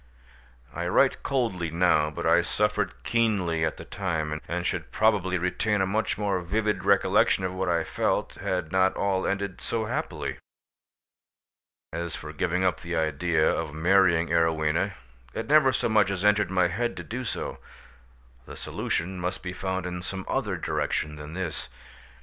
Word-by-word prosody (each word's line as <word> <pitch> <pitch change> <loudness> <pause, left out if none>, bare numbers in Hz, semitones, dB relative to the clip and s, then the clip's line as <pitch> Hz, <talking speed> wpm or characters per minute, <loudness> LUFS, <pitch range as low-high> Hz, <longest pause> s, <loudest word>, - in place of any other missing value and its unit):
I 85 0 -3
write 130 +9 +3
coldly 115 - -1
now, 80 -2 +3
but 75 - -5
I - - +5
suffered - - -1
keenly 100 -9 +1
at 80 - -1
the - - -9
time, 80 -5 -2
and 85 +1 -2
should 85 -8 -2
probably 100 -3 +2
retain 95 +4 0
a 95 - +3
much 105 +4 0
more 100 -3 0
vivid 105 +4 -1
recollection 95 - +3
of 90 -1 -2
what 95 0 -1
I 85 -1 +2
felt, - - -1
had 90 -3 -2
not 95 0 +3
all 95 -1 0
ended 100 -1 -2
so 115 -1 -2
happily. - - -3 1.5
As 85 -2 -3
for 75 +1 -8
giving 90 +2 0
up 90 -1 +1
the 85 0 -4
idea 80 +1 +1
of 75 - -1
marrying 85 0 +4
Arowhena, 80 +2 +2 0.4
it 115 - -2
never 145 -2 +5
so - - +1
much 105 -3 +3
as 100 0 -2
entered 105 -2 +4
my 90 -1 +3
head 120 +8 -2
to - - -5
do 125 +3 -5
so: - - -4 0.9
the - - -8
solution 90 +2 -3
must 90 +1 -3
be 90 -1 -4
found 95 -1 -3
in 90 0 -4
some 95 +1 -5
other - - -1
direction 75 0 -1
than 75 +2 -8
this. 80 -6 -4
90 Hz, 165 wpm, -27 LUFS, 85-100 Hz, 1.5 s, I